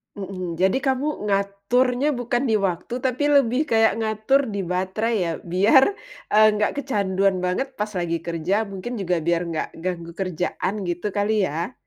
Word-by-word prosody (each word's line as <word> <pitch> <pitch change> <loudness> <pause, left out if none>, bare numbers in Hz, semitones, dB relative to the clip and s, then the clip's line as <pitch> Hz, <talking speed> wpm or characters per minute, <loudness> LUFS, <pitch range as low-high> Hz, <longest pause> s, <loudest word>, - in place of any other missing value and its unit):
Mhm, 185 -3 -5
jadi 190 +5 +3
kamu 270 -1 -1
ngaturnya 210 +7 +1
bukan 245 +1 -1
di - - +2
waktu, 180 +6 -5
tapi 260 +1 -1
lebih 270 +2 +3
kayak 225 0 +4
ngatur 220 +5 +1
di 200 - -2
baterai 190 +5 -1
ya? 165 - -1
Biar, 200 +10 +4 0.4
eee, 215 +1 +6
nggak 210 0 +1
kecanduan 195 -8 0
banget 180 +9 -1
pas 210 -3 -3
lagi 170 -2 -1
kerja, 170 +5 -1
mungkin 195 +6 -6
juga 180 -2 0
biar 170 0 +2
nggak 160 - -2
ganggu 170 -2 -4
kerjaan, 180 +1 -2
gitu 175 +4 -2
kali 205 +2 +1 0.2
ya? 165 - -4
200 Hz, 155 wpm, -23 LUFS, 180-240 Hz, 0.4 s, eee